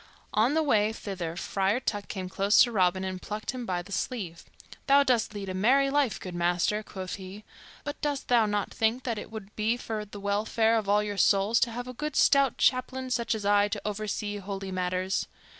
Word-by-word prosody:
On 230 +7 +3
the 320 - +3
way 215 -7 +3
thither 185 -6 -5
Friar 195 +5 0
Tuck 205 -5 -3
came 190 -2 -5
close 195 +3 +2
to 240 - -1
Robin 185 -3 +2
and 185 -1 -4
plucked 215 +1 -4
him 250 -2 -6
by 175 -1 -1
the 200 - -14
sleeve. 190 -7 -4 0.4
"Thou 280 0 +6
dost 240 -5 +1
lead 200 -1 -5
a 185 - -3
merry 265 +8 +3
life, 280 -5 +1
good 185 - -7
master," 175 +4 +1
quoth 190 -3 -6
he, 195 +2 -9 0.4
"but 290 0 -6
dost 290 -3 -2
thou 235 -3 +4
not 205 -1 -2
think 225 +3 0
that 230 -4 -2
it - - -8
would 215 -2 -9
be 220 +3 +1
for 220 -3 -4
the 205 0 -10
welfare 215 +3 +1
of 215 -3 -1
all 210 +1 +4
your 205 -1 -4
souls 200 +3 +4
to 235 - +1
have 245 +2 -5
a 250 - -6
good 300 +3 -4
stout 275 -2 +4
chaplain, 255 0 +1
such 235 -2 0
as 210 -2 -5
I, 205 0 +4
to 205 0 -4
oversee 210 0 -3
holy 195 -1 -5
matters? 185 +1 -1
210 Hz, 210 wpm, -28 LUFS, 195-240 Hz, 0.4 s, Thou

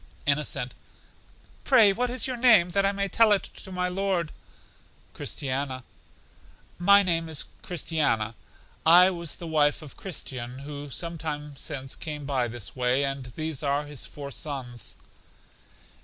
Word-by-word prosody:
Innocent: - - 0 0.9
Pray 225 -7 +6
what 245 +4 0
is 250 0 +1
your 255 - -2
name, 225 -8 +5
that 195 +1 +3
I - - +2
may 200 0 -1
tell 225 +2 +4
it 200 - +1
to 190 - -7
my 180 0 0
Lord? 180 -3 -1 0.8
Christiana: 130 -1 -3 1.0
My 200 +3 +7
name 165 -3 0
is 155 -3 -2 0.2
Christiana; 145 - 0 0.5
I 180 +3 +8
was 170 -4 -3
the 170 - -8
wife 150 -2 +2
of 145 - -11
Christian, 130 -9 -6
who 145 0 -7
some 165 +4 -4
time 150 -2 -4
since 135 -2 -4
came 150 -3 -5
by 130 -3 0
this 115 -3 -6
way, 125 +2 +2
and 135 -1 -3
these 155 -3 -3
are 145 0 0
his 145 -2 -5
four 140 -1 -8
sons. 130 -5 -4
155 Hz, 145 wpm, -27 LUFS, 140-185 Hz, 1.0 s, I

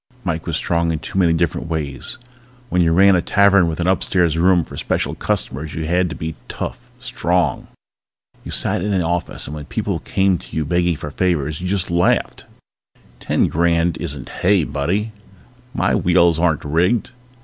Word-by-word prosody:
Mike 80 -4 -3
was 85 -2 0
strong 85 -1 0
in 80 - -1
too 80 +4 -4
many 85 -3 +4
different 85 0 0
ways. 75 -5 -2 0.5
When 90 -2 +2
you 80 -1 +3
ran 95 +3 +5
a 90 - +2
tavern 100 -1 +4
with 80 0 -3
an 85 - 0
upstairs 90 -3 +2
room 90 +1 +3
for - - -11
special - - -1
customers 75 +3 -3
you 80 - -3
had 90 +2 +1
to 85 - -6
be 80 0 -4
tough, - - -6
strong. 90 0 -1 0.8
You - - -9
sat - - 0
in 105 0 -1
an 95 -2 +1
office 85 +1 -2
and 75 - -6
when 75 -1 -7
people - - -2
came 95 -2 +1
to 90 - -9
you 80 - 0
begging 85 +2 +1
for 75 0 -7
favors 80 -2 -1
you 90 - -3
just 95 -2 -1
laughed. 85 +1 +1 0.7
Ten - - +1
grand 85 0 +1
isn't 75 -6 -5
hay, 95 -2 +4
buddy! 85 +11 -2 0.6
My - - 0
wheels 85 -2 +3
aren't 85 -4 +1
rigged. 90 - +1
85 Hz, 180 wpm, -19 LUFS, 80-90 Hz, 0.8 s, ran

